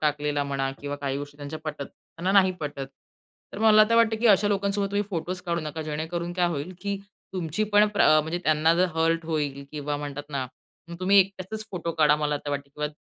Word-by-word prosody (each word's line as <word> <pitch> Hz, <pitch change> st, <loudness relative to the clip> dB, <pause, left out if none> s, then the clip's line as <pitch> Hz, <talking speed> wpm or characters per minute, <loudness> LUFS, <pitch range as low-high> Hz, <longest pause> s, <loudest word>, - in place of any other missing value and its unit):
टाकलेला 150 Hz, -1 st, 0 dB
म्हणा 135 Hz, -1 st, -1 dB
किंवा 145 Hz, 0 st, -4 dB
काही 140 Hz, -1 st, -3 dB
गोष्टी 145 Hz, 0 st, -8 dB
त्यांच्या 145 Hz, +2 st, -6 dB
पटत 150 Hz, -2 st, -4 dB
त्यांना 180 Hz, +4 st, -5 dB
नाही 190 Hz, -2 st, +5 dB
पटत. 140 Hz, -2 st, -4 dB, 0.7 s
तर -, -, -7 dB
मला 215 Hz, -1 st, +7 dB
तर -, -, +4 dB
वाटतं 230 Hz, -1 st, +4 dB
की 240 Hz, -, +3 dB
अशा 205 Hz, -1 st, +5 dB
लोकांसोबत 200 Hz, 0 st, 0 dB
तुम्ही 205 Hz, 0 st, +1 dB
फोटोच 180 Hz, +1 st, -3 dB
काढू 170 Hz, -2 st, -1 dB
नका, 155 Hz, +1 st, -5 dB
जेणेकरून 160 Hz, +3 st, -3 dB
काय 175 Hz, -1 st, +1 dB
होईल 165 Hz, +2 st, -4 dB
की 200 Hz, 0 st, -2 dB, 0.4 s
तुमची 180 Hz, +3 st, -1 dB
पण 210 Hz, 0 st, +4 dB
प्र 210 Hz, -1 st, +3 dB
म्हणजे 160 Hz, +3 st, -3 dB
त्यांना 155 Hz, +1 st, +3 dB
जर 180 Hz, +2 st, +3 dB
हर्ट 165 Hz, 0 st, +1 dB
होईल. 145 Hz, -4 st, -2 dB
किंवा 145 Hz, -1 st, -3 dB
म्हणतात 145 Hz, 0 st, -5 dB
ना, 135 Hz, -3 st, -3 dB, 0.4 s
मग 170 Hz, -, -7 dB
तुम्ही 195 Hz, +2 st, +5 dB
एकट्याचंच 195 Hz, +3 st, 0 dB
फोटो 170 Hz, -3 st, -3 dB
काढा, 150 Hz, -2 st, +4 dB
मला 150 Hz, -1 st, 0 dB
तर 145 Hz, -, -3 dB
वाटते. 140 Hz, 0 st, -4 dB
किंवा 150 Hz, 0 st, -2 dB
160 Hz, 210 wpm, -26 LUFS, 145-190 Hz, 0.7 s, मला